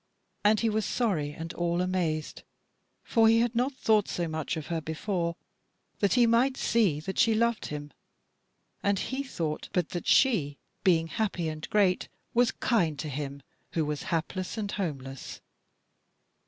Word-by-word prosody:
And 210 +1 +4
he 230 - +2
was 215 0 +1
sorry 185 -14 0
and 165 +2 -7
all 175 0 0
amazed: 175 -4 -1 0.6
for 225 -2 +4
he 225 +1 +6
had 240 0 +1
not 250 +4 +1
thought 215 -5 +2
so 175 -1 -2
much 160 +1 -3
of 155 - -5
her 165 -1 -2
before, 170 +2 -2 0.6
that 200 - +3
he 245 -2 +5
might 240 +3 +3
see 200 -11 +2
that 190 +4 -4
she 225 -1 +5
loved 235 0 +1
him; 150 0 -6 0.9
and 200 0 +2
he 260 +8 -2
thought 165 - -4
but 175 -3 +1
that 175 - -5
she, 160 - +3 0.3
being 170 -4 +4
happy 175 -2 -1
and 155 0 -6
great, 195 -4 +2 0.2
was 240 0 +4
kind 170 - +1
to 155 +1 -4
him 140 0 -5 0.3
who 160 -2 +1
was 150 -1 -3
hapless 180 +5 -2
and 205 -2 -2
homeless. 135 -8 -5
180 Hz, 160 wpm, -29 LUFS, 155-220 Hz, 0.9 s, he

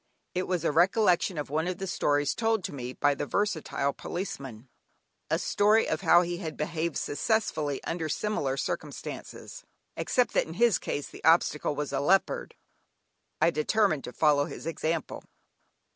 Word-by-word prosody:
It 185 +1 -1
was 180 -3 -1
a - - +3
recollection 180 +1 +3
of 145 -2 -4
one 160 +3 0
of 180 -1 -2
the 195 - -4
stories 145 -5 +1
told 225 -4 0
me 125 -3 -6
by 145 +2 +2
the 145 - -4
versatile 160 -8 -1
policeman; 135 - -6 0.6
a - - +2
story 210 +2 +3
of - - -1
how 175 -1 +6
he 175 0 -3
had 160 -4 -6
behaved 165 0 -2
successfully 155 -5 -1
under 165 -2 -3
similar 145 -8 -1
circumstances, - - -6 0.3
except 250 -1 +1
that - - +2
in 160 - -8
his 235 -1 +3
case 145 - -3
the - - -13
obstacle 160 -2 +3
was 145 -1 -3
a 135 - +1
leopard. 195 - +1 0.8
I 170 - +4
determined 155 0 +1
to - - -7
follow 145 0 +3
his 155 - -8
example. 165 -1 -3
165 Hz, 160 wpm, -28 LUFS, 145-195 Hz, 0.8 s, how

